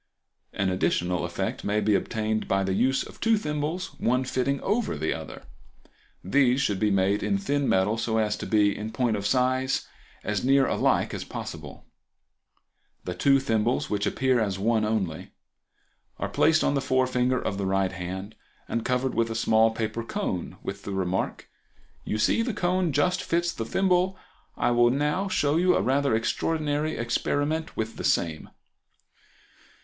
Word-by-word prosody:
An 100 -1 -1
additional 90 -1 0
effect - - -3
may 105 +1 +1
be 105 0 +2
obtained 110 +1 -1
by 95 0 +1
the 95 0 -1
use 135 +7 +2
of - - -13
two 225 0 +3
thimbles, 150 0 -3
one 125 +2 +1
fitting 130 +2 -1
over 210 - 0
the 80 +2 -1
other. - - -8 0.8
These 130 +6 +3
should 105 -8 0
be 105 - +2
made 100 +1 +2
in 200 - +1
thin 145 -8 0
metal 95 +4 +2
so 110 -1 0
as 105 -1 +1
to - - -6
be, 105 -2 +3
in 110 +1 -5
point 120 -1 +1
of 100 -1 -2
size, 130 +2 +1 0.4
as 105 -1 -2
near 135 +1 +4
alike - - +1
as - - -4
possible. - - -8 1.2
The 90 - -4
two 135 +7 +3
thimbles, 115 -2 0
which 100 -1 0
appear 130 -2 +1
as 100 -4 -1
one 110 +2 +1
only, 100 -8 -2 0.8
are - - -3
placed 155 0 +3
on - - +2
the 140 - 0
forefinger 130 -1 +1
of 100 - -3
the 100 - -1
right 95 -1 +1
hand, 95 +3 -6 0.3
and 115 - -2
covered 125 +1 0
with 115 0 +1
a 115 - -4
small 110 0 +4
paper 110 0 -3
cone, 115 - -4
with 100 0 -5
the 100 - -6
remark, 95 -1 -2 0.6
"You 110 - -2
see 110 - +2
the 230 -2 -2
cone 180 -2 +1
just 145 +6 +1
fits 170 0 0
the 115 - -5
thimble; 185 +5 +1 0.4
I 120 - +1
will 120 0 +4
now 150 +9 0
show 150 -5 +1
you 180 +1 +4
a - - +2
rather 135 -2 +2
extraordinary 150 +6 -1
experiment 145 +6 -1
with 110 +1 -3
the - - -5
same." 80 -3 0
120 Hz, 170 wpm, -26 LUFS, 105-145 Hz, 1.2 s, near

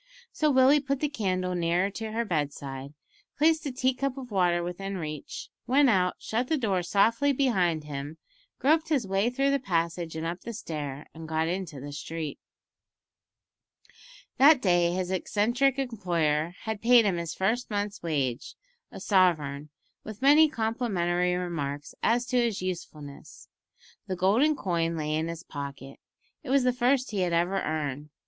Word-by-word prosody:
So 305 - +1
Willie 265 +1 +5
put 275 -1 -2
the 300 - +1
candle 185 -8 -1
nearer 175 +3 +1
to 220 +2 -5
her 230 +2 -1
bedside, 140 -4 -4 0.4
placed 315 0 +3
a - - -2
tea 255 +1 +1
cup 275 +1 -3
of 255 -3 -8
water 175 -3 +2
within 195 +3 -4
reach, 155 -3 -6 0.2
went 270 0 +5
out, 180 -3 +2
shut 240 +3 -2
the 315 - +1
door 200 -8 0
softly 225 +10 +2
behind 190 - +1
him, 145 +1 -6 0.4
groped 315 +5 +2
his 280 -8 +1
way 195 +4 +1
through 275 +3 +1
the 280 - +2
passage 170 -6 -2
and 160 +1 -4
up 170 +2 -4
the 235 - -6
stair, 150 -7 -5
and 160 0 -9
got 160 0 0
into 175 -5 -4
the 145 +2 -7
street. 155 +1 -5 2.0
That 285 +1 +7
day 175 -5 +3
his 185 0 -2
eccentric 240 +8 +1
employer 175 - -1
had 220 -2 -4
paid 235 -1 +6
him 190 -4 +1
his 170 -2 -4
first 225 +6 0
month's 205 -1 -3
wage, 140 -7 -2 0.4
a - - -9
sovereign, 155 -7 +1 0.3
with 215 -2 -8
many 300 +3 +7
complimentary 190 - 0
remarks 150 -5 -4
as 240 +2 +2
to 250 0 -1
his 230 -4 0
usefulness. 155 -6 -7 0.6
The 185 - -2
golden 220 - +3
coin 170 -6 -1
lay 155 -1 -2
in 160 +1 0
his 170 0 -6
pocket. 140 -2 -8 0.4
It 290 - -10
was 270 0 +3
the 250 0 +2
first 250 +1 +1
he 205 - -2
had 180 -2 0
ever 175 +3 +1
earned. 150 -2 -3
185 Hz, 165 wpm, -27 LUFS, 165-245 Hz, 2.0 s, That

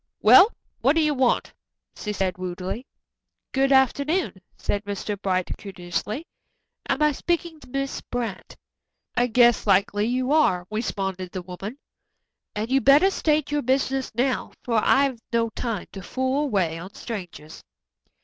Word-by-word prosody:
"Well, 395 +4 +8 0.3
what 275 +5 +3
do 325 - +4
you 305 -1 +2
want?" 260 -3 +1 0.4
she 210 - -4
said 190 -3 -2
rudely. 185 +7 -5 0.6
"Good 270 +1 +2
afternoon," 275 - +2 0.2
said 205 0 -2
Mr. 205 0 -4
Bright 185 -2 0
courteously. 200 - -4 0.6
"Am 275 +3 +1
I 300 - +4
speaking 335 +2 -2
to 255 - -16
Miss 275 +1 -3
Brant?" 230 -6 -4 0.6
"I 245 - +3
guess 240 -1 +4
likely 200 +1 +3
you 255 +3 0
are," 185 - +3
responded 195 -4 -3
the 185 - -4
woman, 195 +7 -7 0.8
"and 215 +4 -3
you 270 0 +4
better 290 +9 +6
state 305 -5 0
your 295 0 +1
business 265 +1 0
now, 255 +2 0
for 230 -3 +1
I've 270 -3 +3
no 230 -1 +1
time 225 -6 -3
to 195 - -8
fool 260 +8 -1
away 180 - 0
on 185 +4 -10
strangers." 175 -8 -8
240 Hz, 145 wpm, -24 LUFS, 195-275 Hz, 0.8 s, Well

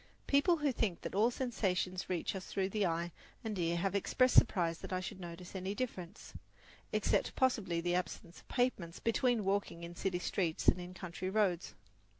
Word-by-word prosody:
People 310 +5 +4
who 295 -2 +1
think 210 -8 -1
that - - -5
all 210 +5 +4
sensations 190 -7 -1
reach 180 +1 -1
us 190 - -6
through 190 -1 -1
the 205 -1 +1
eye 170 +1 -1 0.3
and 220 -2 -2
the 170 -3 0
ear 170 - 0
have 195 +2 0
expressed 255 +6 +3
surprise 170 -6 +4
that - - -8
I 185 - 0
should 185 +1 -6
notice 175 0 -8
any 190 +2 -3
difference, 200 -6 -5 0.6
except - - +1
possibly 205 -10 +1
the 175 +1 0
absence 180 -1 -3
of - - -21
pavements, 220 -10 0
between 230 -1 +2
walking 195 -3 -1
in 170 0 -6
city 185 0 -1
streets 175 -2 -1
and 180 - +5
in 180 +1 -8
country 185 0 -4
roads. 190 -4 +1
185 Hz, 185 wpm, -35 LUFS, 175-220 Hz, 0.6 s, and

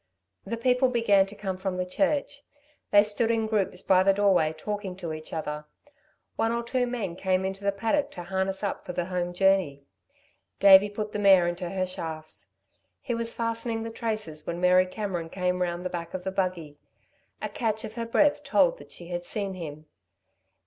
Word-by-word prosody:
The 230 - -3
people 250 +2 +3
began 210 -5 +3
to 200 - -10
come 190 -2 -4
from 190 -1 -3
the 180 - -1
church. 285 +7 -1 0.5
They 205 0 +7
stood 215 +2 0
in 225 -1 +1
groups 200 -4 -1
by 185 -1 +5
the 195 +1 +4
doorway 195 -6 +3
talking 195 +4 -5
to 170 -4 -5
each 155 0 -8
other. 150 -1 -4 0.7
One 225 - +1
or 235 0 -1
two 245 +1 0
men 220 -8 -3
came 185 0 0
into 190 +1 -4
the 200 - +2
paddock 230 +9 0
to 175 - -7
harness 190 +2 -2
up 200 - -2
for 180 - -6
the 175 0 -1
home 175 -1 -1
journey. 180 -7 +2 0.7
Davey 195 +1 +8
put 210 +1 -4
the 210 - -3
mare 190 -3 +6
into 175 0 -3
her 185 0 -1
shafts. 155 - -7 0.5
He - - -3
was 230 0 -1
fastening 230 0 -2
the 225 - -5
traces 215 -10 -4
when 170 0 -3
Mary 180 +1 +4
Cameron 185 -4 -4
came 180 0 -1
round 175 0 -2
the 185 - -2
back 170 0 -5
of 185 - -5
the 190 - -2
buggy. 180 -6 -3 0.6
A - - -3
catch 220 -2 -2
of 220 - -8
her 230 0 -4
breath 290 +4 +3
told - - +3
that - - -14
she 170 0 -9
had 175 0 -3
seen 200 +1 -3
him. 155 -4 -8
195 Hz, 195 wpm, -27 LUFS, 175-225 Hz, 0.7 s, Davey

